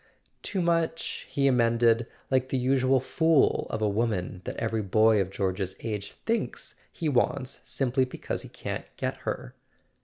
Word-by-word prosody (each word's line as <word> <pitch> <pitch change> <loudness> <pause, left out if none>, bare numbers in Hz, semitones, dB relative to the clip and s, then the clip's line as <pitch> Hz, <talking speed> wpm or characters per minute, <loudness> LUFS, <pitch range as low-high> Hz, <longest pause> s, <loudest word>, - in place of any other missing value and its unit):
"Too 190 -3 -1
much," 165 -1 0
he 140 - 0
emended, 115 -2 +3 0.2
"like 130 0 +2
the 135 - 0
usual 130 +1 +3
fool 160 +3 +3
of 110 - -2
a - - +4
woman 100 -4 -1
that - - -5
every 115 -1 -1
boy 110 +1 +4
of 95 - -2
George's 95 -1 -2
age 105 -3 -4
thinks 230 +1 0 0.2
he 165 - -3
wants 130 -1 0
simply 130 -1 +1
because 130 - -5
he - - -10
can't - - -5
get - - -2
her." - - -3
120 Hz, 155 wpm, -28 LUFS, 110-135 Hz, 0.2 s, a